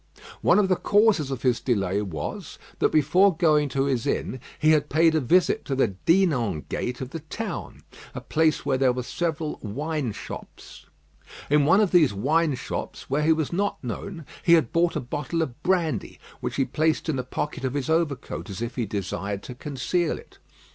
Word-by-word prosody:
One - - +4
of 205 -2 +4
the 185 -1 +2
causes 205 -8 +3
of 135 -3 -5
his 125 -3 +2
delay 100 -5 0
was, 80 -8 -5 0.2
that - - +3
before 165 +5 +4
going 150 -4 +3
to 135 0 0
his 130 -4 -1
inn, 130 - -2 0.2
he 155 0 +4
had 150 -2 +2
paid 160 +2 +4
a 160 - +3
visit 170 +7 +2
to 135 - -2
the 130 -4 +2
Dinan 120 - +1
gate 125 +1 -3
of 130 0 -5
the 165 - -5
town, 175 +5 -6 0.3
a - - -3
place 160 0 +1
where 130 -2 +1
there 130 -2 +4
were 125 0 -3
several 160 +2 -3
wine 145 +4 -3
shops. - - -10 0.6
In 150 -1 +5
one 170 +7 +5
of 205 - +2
these 155 - +4
wine 150 +7 +2
shops, 130 - -6
where 145 +2 +2
he 155 +2 +3
was 160 0 0
not 200 -1 -1
known, 165 - -6 0.2
he 170 - +4
had 160 -1 +3
bought 170 0 +2
a - - 0
bottle 145 +6 -2
of 135 -1 -7
brandy, 175 -3 0 0.2
which - - -4
he 135 - +1
placed 155 +3 0
in 160 - 0
the 130 - -2
pocket 150 +1 -4
of 130 +1 -2
his 140 -1 -2
overcoat, 160 -8 -1
as 95 - -6
if 120 +1 -5
he 120 -4 -1
desired 100 0 -4
to 125 - -7
conceal 150 +6 -1
it. - - -16
150 Hz, 195 wpm, -25 LUFS, 125-165 Hz, 0.6 s, In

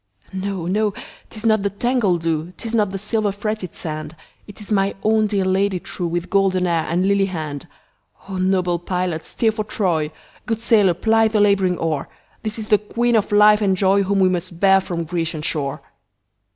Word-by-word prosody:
No! 190 -2 -3
no! 205 +3 0 0.3
'tis 220 0 -7
not 220 -2 +3
the 200 - 0
tangled 200 -5 0
dew,'Tis 165 +7 -3
not 210 -3 +2
the 195 - -4
silver 210 +1 0
fretted 205 -2 -4
sand, 155 -1 -5 0.3
It 205 - -12
is 210 0 -10
my 195 -1 +1
own 215 0 +3
dear 200 -2 0
Lady 190 0 +1
trueWith 175 0 -4
golden 190 -2 +2
hair 170 -2 0
and 180 +3 +1
lily 200 -1 +2
hand!O 160 +3 -9
noble 185 -2 +1
pilot 180 -2 -2
steer 225 -2 0
for 215 0 -3
Troy, 170 -8 -1 0.4
Good 225 -1 -1
sailor 210 -6 +3
ply 225 +4 +3
the 220 -1 0
labouring 195 -3 +3
oar, 155 -4 -2 0.3
This 215 0 -3
is 215 -1 -6
the 210 - +5
Queen 235 +3 0
of 210 -2 +1
life 210 +1 +6
and 195 -2 +2
joyWhom 195 +1 +2
we 190 -1 +4
must 180 -1 -4
bear 195 0 +5
from 170 -2 -4
Grecian 165 -2 -3
shore! 140 -4 -2
195 Hz, 180 wpm, -20 LUFS, 175-210 Hz, 0.4 s, life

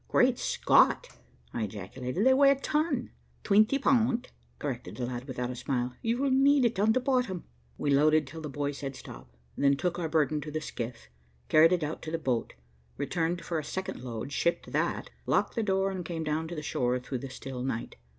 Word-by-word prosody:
"Great - - +3
Scott," - - +3 0.4
I - - -2
ejaculated, 125 - -3
"they 260 - +7
weigh 275 +1 +6
a 275 - +5
ton." 285 -2 -1 0.3
"Twinty 215 +6 +4
pund," 245 -3 +2 0.3
corrected 90 +4 -5
the 125 - -2
lad, 120 0 -5
without 125 -2 -3
a - - -6
smile. 125 0 -2
"You'll 245 +4 +1
need 275 0 +5
it 230 -5 0
on 215 +2 +4
bottom." 250 -7 0 0.3
We 145 - 0
loaded 150 +2 +4
till 160 +4 -9
the 150 - -5
boy 145 +1 -2
said 140 -1 -6
"stop," 60 0 -12 0.2
then 140 0 +3
took 175 +2 -1
our 165 -2 -2
burden 155 -1 +1
to 150 - -6
the 155 +1 -2
skiff, 120 - -6 0.4
carried 160 +2 +6
it 175 -3 +1
out 150 +2 -4
to 155 - -6
the 165 - -1
boat, 130 -7 -2 0.4
returned 170 0 -1
for 165 -2 -1
a - - -5
second 190 -1 -5
load, 120 +2 -5
shipped 170 +4 0
that, - - -1 0.2
locked - - +2
the 230 - 0
door, 195 -2 +1
and 185 -2 -4
came 165 -1 -4
down 155 +1 -1
to 170 - -6
the 150 - -5
shore 125 -3 0
through 125 +1 -5
the 135 - -7
still 130 -1 -7
night. 125 -3 -3
155 Hz, 200 wpm, -29 LUFS, 130-205 Hz, 0.4 s, they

